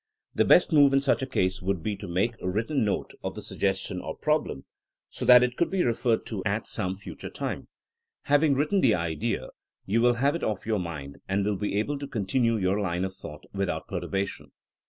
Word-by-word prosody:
The - - +3
best - - +5
move 145 -2 +6
in 135 - +4
such 140 -1 +2
a 130 - -2
case 95 -7 0
would 95 -3 -1
be 105 - -1
to 100 - -8
make 95 +7 0
| - - -25
written 110 +10 0
note 105 - -1
of - - -4
the - - -6
suggestion 95 -1 -2
or - - -6
problem, 150 - -1 0.5
so - - -5
that 125 0 +8
it 125 0 0
could 170 - +1
be 190 -2 +1
referred 115 -1 +1
to 100 -5 -4
at 105 +1 -1
some 95 -3 -3
future 100 - -8
time. - - -4 0.6
Having 145 0 +3
written 150 +8 +2
the 115 -5 +4
idea, 80 -3 -2 0.4
you 110 +4 +1
will 120 0 +4
have 140 +4 +2
it 170 - -4
off 105 -3 -2
your 110 -2 0
mind, 75 -6 -6
and 100 +1 +1
will 105 0 +1
be 100 +1 -2
able 140 +7 -1
to 140 - -5
continue 115 +1 +1
your 95 0 +1
line 90 -2 -1
of 95 - -5
thought 75 -5 -10
without 100 -1 -2
perturbation. 100 0 -3
105 Hz, 215 wpm, -27 LUFS, 95-130 Hz, 0.6 s, that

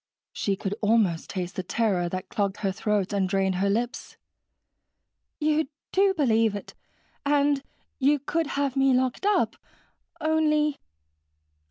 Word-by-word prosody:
She 200 - -1
could 195 +1 -3
almost 210 -6 +2
taste 180 -1 -4
the - - 0
terror 185 -2 0
that 185 +1 -5
clogged 200 -2 -1
her 195 - +2
throat 205 0 -1
and 195 -2 +1
dried 190 -1 +1
her 200 - +2
lips. 235 +4 -2 1.2
"You 305 0 +1 0.2
do 390 0 +3
believe 225 - +2
it. 200 - -7 0.5
And 285 -1 +2 0.4
you 285 +2 +4
could 320 +3 -1
have 280 -2 0
me 270 -1 +4
locked 260 +9 0
up. 415 - +2 0.6
Only 305 -2 +2
230 Hz, 135 wpm, -26 LUFS, 195-295 Hz, 1.2 s, you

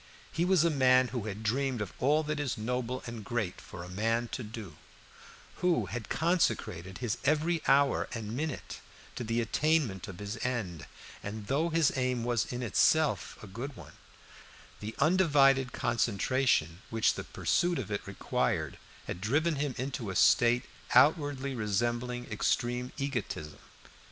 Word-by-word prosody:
He 170 - 0
was 180 -3 +4
a 170 - +3
man 130 -3 +4
who 120 -3 -4
had 105 +1 -5
dreamed 130 +3 0
of 105 -3 -4
all 150 +4 +3
that 150 0 -2
is 145 -5 -2
noble 125 +3 -2
and 115 -2 -6
great 105 -4 -3
for 85 0 -9
man 115 +5 0
to - - -4
do, 110 -4 -8 0.8
who 170 - +2
had 110 -1 -6
consecrated 110 - 0
his 120 -4 -2
every 155 +4 +2
hour 140 0 +4
and 115 -2 -4
minute 150 +1 -4 0.4
to - - -4
the 115 +1 0
attainment 130 - +1
of 90 - -8
his 105 +3 -5
end; 95 - -3 0.3
and 105 +1 -6
though 150 +8 +1
his 165 -3 +3
aim 125 -2 0
was 120 -1 0
in 125 0 -3
itself 150 +8 +2
a - - -6
good 120 +8 -6
one, - - -12 0.9
the 110 +2 -6
undivided 140 -6 +4
concentration 115 - +1
which 115 -1 +2
the - - -5
pursuit 175 -1 0
of 110 -5 -4
it 100 - -1
required 100 - -1 0.3
had 90 - -5
driven 150 - +1
him 140 -2 -1
into 125 -4 -3
a 95 - -4
state 120 +5 +4 0.3
outwardly 140 0 +4
resembling 120 +2 -1
extreme 120 +4 0
egotism. 125 - -4
125 Hz, 150 wpm, -30 LUFS, 110-140 Hz, 0.9 s, was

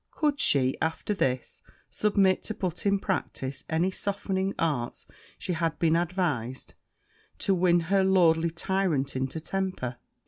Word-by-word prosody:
Could 295 -3 0
she, 130 -2 +4
after 160 +6 -1
this, 130 -10 -2 0.3
submit 200 -3 +2
to 220 - -4
put 180 +1 -3
in 200 0 +3
practice 140 -8 -3
any 170 +4 +1
softening 195 0 -2
arts 140 -8 -2 0.3
she 180 - -3
had 165 -2 -1
been 165 -1 +3
advised, 165 -8 -2 0.6
to 195 - +1
win 175 -1 +3
her 190 +3 +2
lordly 170 -3 +4
tyrant 170 -5 -1
into 130 +4 -2
temper? 185 -8 -3
175 Hz, 135 wpm, -27 LUFS, 150-190 Hz, 0.6 s, she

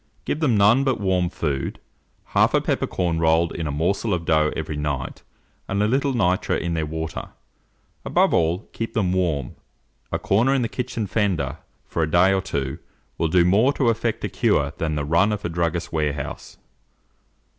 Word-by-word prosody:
Give 150 - -2
them 130 -9 +2
none 105 +7 +5
but 130 -5 0
warm 95 -3 +1
food, 70 -6 -3 0.5
half - - +4
a - - +5
peppercorn 85 -3 -1
rolled 80 +1 +3
in 80 -2 -3
a - - -2
morsel 90 +7 0
of 85 -1 -5
dough 80 -2 +3
every 75 - -4
night, 70 -3 -3 0.5
and 100 +1 0
a - - +2
little 135 +4 +1
nitre 95 -6 +1
in 85 0 -2
their 80 -2 -1
water. 80 +1 -5 0.7
Above - - +2
all, 85 +4 +1
keep 115 0 -5
them 95 -5 +1
warm; 80 -8 -1 0.5
a - - 0
corner 120 +7 +2
in 130 - +1
the - - 0
kitchen 115 -2 -3
fender, 90 - -1 0.3
for 85 - -3
a 80 - +1
day 90 +4 +4
or 95 - +1
two, 70 -4 -3 0.4
will 80 - +2
do 85 +2 +4
more 110 +10 +4
to 130 -4 +2
effect 115 0 -1
a - - -1
cure 105 - +1
than 80 -2 -1
the 75 -1 -2
run 85 +8 +3
of 105 -1 -3
a - - -1
druggist's 85 0 -2
warehouse. 75 -4 -3
90 Hz, 185 wpm, -23 LUFS, 80-105 Hz, 0.7 s, none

